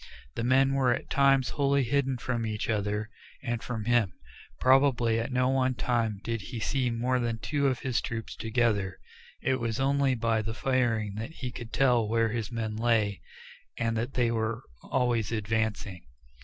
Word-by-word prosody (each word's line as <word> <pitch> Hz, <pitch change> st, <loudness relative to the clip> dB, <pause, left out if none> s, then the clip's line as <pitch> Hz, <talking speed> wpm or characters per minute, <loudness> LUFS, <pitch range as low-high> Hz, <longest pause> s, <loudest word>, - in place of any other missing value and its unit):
The -, -, -3 dB
men 135 Hz, +2 st, +4 dB
were 130 Hz, -2 st, +3 dB
at -, -, -9 dB
times 135 Hz, -3 st, +4 dB
wholly 140 Hz, 0 st, +2 dB
hidden 135 Hz, +1 st, 0 dB
from 120 Hz, -1 st, -2 dB
each 110 Hz, 0 st, -2 dB
other, 105 Hz, +1 st, -2 dB, 0.3 s
and 120 Hz, -3 st, -2 dB
from 110 Hz, -4 st, -4 dB
him; 120 Hz, -6 st, +2 dB, 0.5 s
probably 130 Hz, -4 st, +4 dB
at 115 Hz, +3 st, -3 dB
no 125 Hz, 0 st, +2 dB
one 130 Hz, -1 st, +1 dB
time 115 Hz, -4 st, 0 dB
did 115 Hz, -1 st, -2 dB
he 120 Hz, +4 st, -6 dB
see 130 Hz, +2 st, 0 dB
more 125 Hz, +2 st, 0 dB
than 115 Hz, -2 st, -1 dB
two 140 Hz, +4 st, 0 dB
of 130 Hz, -3 st, -1 dB
his 130 Hz, -3 st, 0 dB
troops 115 Hz, -1 st, -5 dB
together. 110 Hz, -5 st, 0 dB, 0.5 s
It 130 Hz, -1 st, +1 dB
was 115 Hz, -1 st, -2 dB
only 135 Hz, 0 st, +2 dB
by 115 Hz, -1 st, +1 dB
the 110 Hz, +1 st, -4 dB
firing 120 Hz, -6 st, 0 dB
that 115 Hz, +5 st, -4 dB
he 125 Hz, -5 st, -5 dB
could 120 Hz, -1 st, -8 dB
tell 125 Hz, -5 st, +3 dB
where 115 Hz, +1 st, +2 dB
his 115 Hz, 0 st, -3 dB
men 110 Hz, -2 st, -3 dB
lay, 110 Hz, -4 st, +1 dB, 0.6 s
and 115 Hz, -1 st, 0 dB
that 115 Hz, +4 st, -3 dB
they 120 Hz, -2 st, +2 dB
were 115 Hz, +1 st, -2 dB, 0.2 s
always 120 Hz, -5 st, 0 dB
advancing. 110 Hz, -4 st, -2 dB
120 Hz, 175 wpm, -28 LUFS, 110-130 Hz, 0.6 s, men